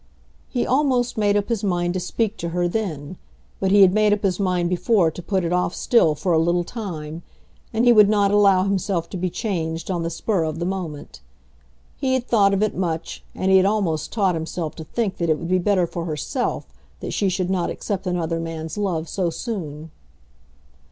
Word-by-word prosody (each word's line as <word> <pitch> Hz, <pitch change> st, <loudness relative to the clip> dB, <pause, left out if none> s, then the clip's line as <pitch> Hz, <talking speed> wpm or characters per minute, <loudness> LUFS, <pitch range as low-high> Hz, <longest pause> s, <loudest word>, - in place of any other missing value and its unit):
He 245 Hz, -, -1 dB
almost 255 Hz, -3 st, +1 dB
made 205 Hz, -1 st, +2 dB
up 205 Hz, +2 st, -2 dB
his 225 Hz, -3 st, -1 dB
mind 175 Hz, -3 st, 0 dB
to 185 Hz, -, -1 dB
speak 220 Hz, +4 st, -1 dB
to 170 Hz, -, -4 dB
her 175 Hz, +1 st, 0 dB
then; 175 Hz, -5 st, -4 dB, 0.4 s
but 190 Hz, -, +1 dB
he 200 Hz, +1 st, +6 dB
had 185 Hz, -1 st, +5 dB
made 215 Hz, 0 st, +3 dB
up 210 Hz, -, -2 dB
his 190 Hz, -1 st, 0 dB
mind 180 Hz, -3 st, +1 dB
before 180 Hz, 0 st, +2 dB
to 175 Hz, -, -8 dB
put 190 Hz, +1 st, -1 dB
it 170 Hz, -, -1 dB
off 180 Hz, 0 st, 0 dB
still 165 Hz, -11 st, +3 dB
for 175 Hz, +4 st, 0 dB
a 160 Hz, -, +4 dB
little 175 Hz, +2 st, +2 dB
time, 170 Hz, -7 st, -6 dB, 0.5 s
and 230 Hz, +2 st, +1 dB
he 240 Hz, -, +7 dB
would 210 Hz, -2 st, +7 dB
not 205 Hz, -2 st, +3 dB
allow 200 Hz, -2 st, +5 dB
himself 190 Hz, -3 st, -1 dB
to 190 Hz, -, -4 dB
be 180 Hz, +1 st, -1 dB
changed 165 Hz, -3 st, -3 dB
on 175 Hz, -2 st, -1 dB
the 165 Hz, -, -2 dB
spur 175 Hz, +2 st, -1 dB
of 155 Hz, 0 st, -3 dB
the 170 Hz, -, -2 dB
moment. 180 Hz, -6 st, -5 dB, 0.8 s
He 260 Hz, -2 st, +1 dB
had 255 Hz, -1 st, -2 dB
thought 200 Hz, -4 st, +4 dB
of 200 Hz, +1 st, +1 dB
it 215 Hz, 0 st, 0 dB
much, 165 Hz, -3 st, -3 dB
and 190 Hz, -, 0 dB
he 190 Hz, -, +7 dB
had 190 Hz, -, +4 dB
almost 185 Hz, -8 st, -1 dB
taught 195 Hz, -5 st, +1 dB
himself 160 Hz, -1 st, -4 dB
to 160 Hz, -, -6 dB
think 200 Hz, +3 st, -2 dB
that 170 Hz, -1 st, -1 dB
it 155 Hz, -, +3 dB
would 170 Hz, +1 st, -6 dB
be 185 Hz, 0 st, +3 dB
better 185 Hz, -1 st, +2 dB
for 170 Hz, 0 st, -5 dB
herself 155 Hz, -4 st, -2 dB, 0.3 s
that -, -, -5 dB
she 200 Hz, -, +1 dB
should 185 Hz, 0 st, -1 dB
not 180 Hz, -2 st, 0 dB
accept 200 Hz, -2 st, -4 dB
another 165 Hz, -2 st, -1 dB
man's 165 Hz, +1 st, -5 dB
love 170 Hz, -5 st, -1 dB
so 180 Hz, -1 st, -1 dB
soon. 160 Hz, -6 st, -5 dB
185 Hz, 210 wpm, -22 LUFS, 165-205 Hz, 0.8 s, he